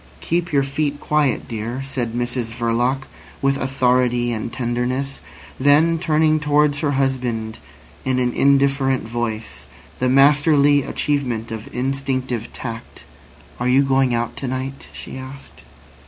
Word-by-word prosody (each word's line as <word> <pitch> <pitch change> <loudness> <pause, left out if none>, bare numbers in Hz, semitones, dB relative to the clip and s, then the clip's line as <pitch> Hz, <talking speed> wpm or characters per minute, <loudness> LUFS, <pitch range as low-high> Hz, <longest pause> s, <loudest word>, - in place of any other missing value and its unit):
"Keep 170 +1 -1
your 140 -2 +3
feet 145 +1 -2
quiet, 150 -5 0
dear," 115 +3 -4
said 125 -4 -3
Mrs 120 -1 -1
Verloc, 120 +3 0 0.4
with 135 0 +2
authority 125 -2 +1
and 115 0 -3
tenderness; 125 +3 -2 0.4
then 150 +5 +4
turning 155 -2 +2
towards 150 -1 +2
her 150 -3 0
husband 125 -5 -1 0.4
in 130 -1 0
an 125 -1 +1
indifferent 135 -2 +2
voice, 115 -1 -4 0.3
the 125 - +1
masterly 145 +1 +5
achievement 125 -6 -2
of 110 -1 -6
instinctive 130 -2 -2
tact: 115 -2 -7 0.6
"Are 125 - 0
you 135 +2 +5
going 135 -1 +2
out 120 0 -1
to 135 - -4
night?" 130 +2 -4
she - - -8
asked. 130 +1 -11
130 Hz, 130 wpm, -21 LUFS, 120-140 Hz, 0.6 s, masterly